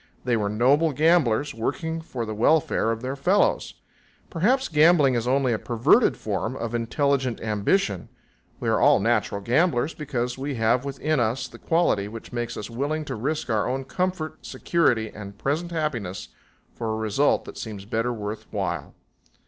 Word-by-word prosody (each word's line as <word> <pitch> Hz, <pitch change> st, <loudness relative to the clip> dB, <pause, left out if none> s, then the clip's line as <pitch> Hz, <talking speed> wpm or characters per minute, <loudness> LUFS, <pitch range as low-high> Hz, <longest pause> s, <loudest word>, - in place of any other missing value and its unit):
They 125 Hz, -1 st, +1 dB
were 105 Hz, -2 st, 0 dB
noble 140 Hz, +9 st, +3 dB
gamblers, 145 Hz, -3 st, +2 dB
working 155 Hz, +8 st, -3 dB
for 125 Hz, -7 st, -5 dB
the 110 Hz, -, -4 dB
welfare 120 Hz, +1 st, +2 dB
of 115 Hz, +1 st, -2 dB
their 130 Hz, +2 st, -3 dB
fellows. 180 Hz, +9 st, +1 dB, 0.6 s
Perhaps 245 Hz, +11 st, +2 dB
gambling 155 Hz, -3 st, +5 dB
is 120 Hz, -1 st, -1 dB
only 130 Hz, -1 st, +2 dB
a 110 Hz, -, -1 dB
perverted 125 Hz, -, +3 dB
form 110 Hz, +4 st, -3 dB
of 115 Hz, -3 st, -4 dB
intelligent 130 Hz, +1 st, 0 dB
ambition 105 Hz, -, 0 dB, 0.5 s
we -, -, -4 dB
are -, -, +2 dB
all -, -, +5 dB
natural 105 Hz, -2 st, 0 dB
gamblers 140 Hz, -, +1 dB
because 125 Hz, -4 st, -3 dB
we 140 Hz, 0 st, -3 dB
have 115 Hz, +3 st, +1 dB
within 140 Hz, +2 st, -1 dB
us 120 Hz, +3 st, 0 dB
the -, -, -14 dB
quality 165 Hz, -12 st, +1 dB
which 115 Hz, +3 st, -10 dB
makes 120 Hz, -1 st, -3 dB
us 105 Hz, -, -5 dB
willing 145 Hz, +6 st, -2 dB
to -, -, -4 dB
risk 140 Hz, +4 st, -2 dB
our 110 Hz, +1 st, +1 dB
own 135 Hz, +1 st, -2 dB
comfort, 160 Hz, -1 st, -3 dB
security 120 Hz, -10 st, 0 dB
and 100 Hz, -1 st, -9 dB
present 155 Hz, +9 st, -1 dB
happiness 130 Hz, -, -3 dB, 0.4 s
for 115 Hz, -2 st, -3 dB
a 110 Hz, -, -2 dB
result 110 Hz, +6 st, +1 dB
that -, -, -9 dB
seems 105 Hz, -3 st, -7 dB
better 115 Hz, +2 st, -1 dB
worth 105 Hz, -1 st, -5 dB
while. 85 Hz, -8 st, -3 dB
125 Hz, 165 wpm, -25 LUFS, 110-150 Hz, 0.6 s, gambling